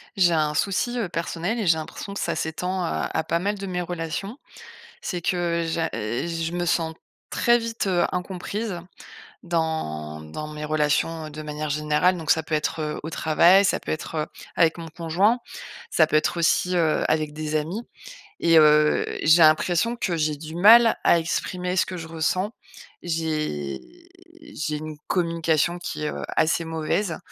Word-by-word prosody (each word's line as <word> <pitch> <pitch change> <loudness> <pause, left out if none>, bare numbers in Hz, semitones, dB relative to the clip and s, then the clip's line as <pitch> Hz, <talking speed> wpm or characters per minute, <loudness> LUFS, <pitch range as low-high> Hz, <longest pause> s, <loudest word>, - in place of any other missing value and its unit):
J'ai 180 -3 +4
un 155 -2 +1
souci, 200 +9 0
heu, 200 - -2
personnel 170 +7 -2
et 215 - -1
j'ai 165 -2 +4
l'impression 180 +5 -7
que 200 - -5
ça - - -1
s'étend, 180 +4 -2
heu, - - -1
à 160 - -1
pas 170 - 0
mal 205 +3 -1
de 195 - -6
mes 180 -1 -2
relations. 175 - -4 0.6
C'est 175 -2 -4
que 170 -1 0
j'a 165 0 -1
je 165 +10 -2
me 175 0 -2
sens 165 -1 0 0.4
très 240 0 +3
vite, 230 -2 -3
heu, 180 -2 +2
incomprise 185 +2 -4 0.6
dans 160 - -2
dans 80 - -7
mes 150 0 -6
relations 155 +1 0
de 155 +1 -8
manière 150 0 -4
générale, 150 +5 +2
donc 160 -2 -3
ça 160 - +4
peut 155 - -3
être, 155 +1 -1
heu, 150 0 -3
au 160 - -5
travail, 170 +5 +4
ça - - +1
peut - - -4
être, 155 - -5
heu, 155 -1 -1 0.3
avec 165 -1 +3
mon 165 -1 -7
conjoint, 175 +8 +1 0.5
ça 160 - +4
peut 155 - +1
être 155 +2 +1
aussi, 180 +2 +2
heu, 160 -3 +2
avec 155 -1 0
des 155 0 -3
amis 165 +8 -2 0.6
et 165 -1 +5
heu, 150 -1 +5 0.2
j'ai 160 +2 +5
l'impression 170 +8 +3
que 185 -8 -2
j'ai 155 -1 0
du 155 +2 -9
mal 225 +5 +7
à 170 - +5
exprimer 180 +2 -2
ce 185 - +3
que 185 - -6
je 160 - -7
ressens. 165 +5 -1 0.5
J'ai 155 - -2 0.6
j'ai 155 - -4
une 155 0 -7
communication 170 -1 +1
qui 155 - -5
est, - - 0
heu, - - -6
assez 160 +1 +2
mauvaise 160 +3 -1
165 Hz, 175 wpm, -24 LUFS, 155-180 Hz, 0.6 s, mal